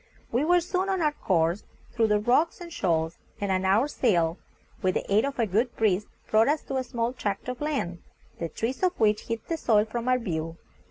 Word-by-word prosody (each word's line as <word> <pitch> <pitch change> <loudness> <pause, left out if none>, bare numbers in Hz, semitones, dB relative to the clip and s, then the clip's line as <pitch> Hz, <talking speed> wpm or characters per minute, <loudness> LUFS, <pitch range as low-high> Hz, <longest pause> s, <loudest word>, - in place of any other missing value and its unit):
We 245 +5 +1
were 350 +2 +4
soon 370 +3 -1
on 380 -1 +1
our 305 -3 +2
course 175 - 0 0.3
through 230 -2 +2
the 210 -1 +3
rocks 250 +10 +2
and 340 -1 -9
shoals, 165 - 0 0.2
and 200 -1 -1
an 190 0 +1
hour's 220 +10 +3
sail, 170 -8 +2 0.4
with 185 -1 +1
the - - -1
aid 215 +5 +4
of 280 0 -4
a 235 - +2
good 220 +5 0
breeze, 210 -2 +1 0.2
brought 220 +2 +5
us 295 +1 +1
to 270 - -3
a 260 - 0
small 240 -1 -2
tract 205 -5 -3
of 250 +1 -5
land, 275 - -2 0.4
the 165 - -3
trees 230 - -3
of 365 -1 +1
which 215 -1 +2
hid 230 -1 -2
the 330 - -1
soil 215 -7 +3
from 235 +2 -4
our 255 - +4
view. 165 -7 -3
225 Hz, 220 wpm, -27 LUFS, 190-275 Hz, 0.4 s, brought